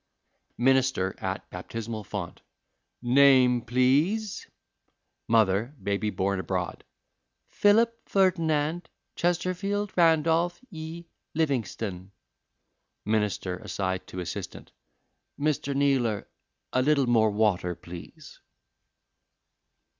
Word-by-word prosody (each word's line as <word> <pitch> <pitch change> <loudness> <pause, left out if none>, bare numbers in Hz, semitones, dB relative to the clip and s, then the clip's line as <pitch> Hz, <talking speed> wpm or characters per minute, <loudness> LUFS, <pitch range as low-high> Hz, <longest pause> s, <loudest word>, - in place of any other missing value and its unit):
Minister 130 -6 +2
(at - - -4
baptismal 115 -1 -6
font): 100 -4 -6 0.6
"Name, 125 -1 +5
please?" 140 - +1 0.8
Mother 110 +3 +2
(baby 100 +1 0
born 100 -1 -1
abroad): 90 -1 -3 0.7
"Philip 230 +3 +2
Ferdinand 165 -3 +1 0.3
Chesterfield 185 +4 -1
Randolph 165 +1 +3
y 165 0 -7 0.3
Livingstone." 110 - -2 0.9
Minister 105 -4 -1
(aside 95 0 -3
to 90 - -7
assistant): 90 - -7 0.7
"Mr. 145 -1 0
Kneeler, 130 -7 +1 0.5
a 130 - +3
little 140 0 +3
more 115 -3 +4
water, 100 -4 +1
please." 85 0 -11
130 Hz, 80 wpm, -27 LUFS, 105-160 Hz, 0.9 s, Name